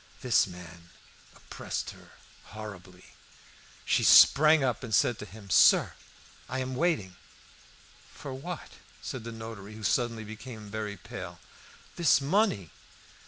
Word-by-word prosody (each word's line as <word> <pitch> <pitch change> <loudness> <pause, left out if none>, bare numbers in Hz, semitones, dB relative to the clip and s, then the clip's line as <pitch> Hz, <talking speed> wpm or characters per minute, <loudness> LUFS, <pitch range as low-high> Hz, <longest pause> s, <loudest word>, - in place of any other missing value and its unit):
This 125 -5 +3
man 85 -1 -12 0.5
oppressed - - -6
her - - -17 0.3
horribly. 95 -4 -11 0.7
She - - +2
sprang 155 +1 +7
up 125 -2 -1
and 110 -4 0
said 120 +2 +2
to - - -7
him 100 0 -12
"Sir, - - +5 0.6
I 130 - -3
am 130 0 -3
waiting." 125 - -1 0.9
"For 140 - -8
what?" 165 +6 -7 0.3
said 130 -4 -6
the 115 - -6
notary, 110 -2 -9
who 110 - -10
suddenly 115 +1 0
became 110 -1 -10
very 105 -1 -4
pale. 90 - -9 0.6
"This 170 -5 +4
money." 140 - 0
110 Hz, 125 wpm, -28 LUFS, 100-130 Hz, 0.9 s, sprang